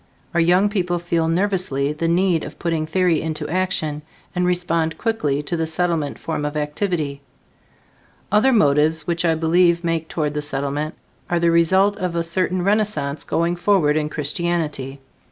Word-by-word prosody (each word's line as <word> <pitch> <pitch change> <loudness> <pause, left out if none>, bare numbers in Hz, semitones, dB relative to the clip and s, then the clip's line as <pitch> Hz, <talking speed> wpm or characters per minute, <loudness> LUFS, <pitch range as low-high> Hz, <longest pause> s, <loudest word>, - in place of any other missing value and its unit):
Our 170 - +2
young 180 +4 +4
people 180 -4 -1
feel 170 -1 0
nervously 165 -6 0
the 165 +2 -2
need 175 -1 +2
of - - -8
putting 165 -2 -1
theory 175 -1 +2
into 155 -1 -3
action, 160 -3 -1 0.3
and 180 -1 0
respond 170 -3 0
quickly 150 -11 -1
to 170 - -3
the 165 -1 -1
Settlement 160 -2 -1
form 160 -2 -4
of 150 +1 -3
activity. 150 -2 -2 1.1
Other 215 +6 +4
motives 155 - +3
which 170 0 -1
I 165 -1 +3
believe 170 +2 +3
make 165 -1 -1
toward 150 -3 -2
the 150 - -2
Settlement 145 +2 -3 0.3
are 175 - +1
the 170 0 +3
result 190 +5 +3
of 180 -2 -3
a 170 - 0
certain 180 +1 0
renaissance 195 -8 0
going 170 +1 0
forward 175 -5 +2
in 150 -1 0
Christianity. 150 -3 -2
165 Hz, 160 wpm, -21 LUFS, 150-180 Hz, 1.1 s, young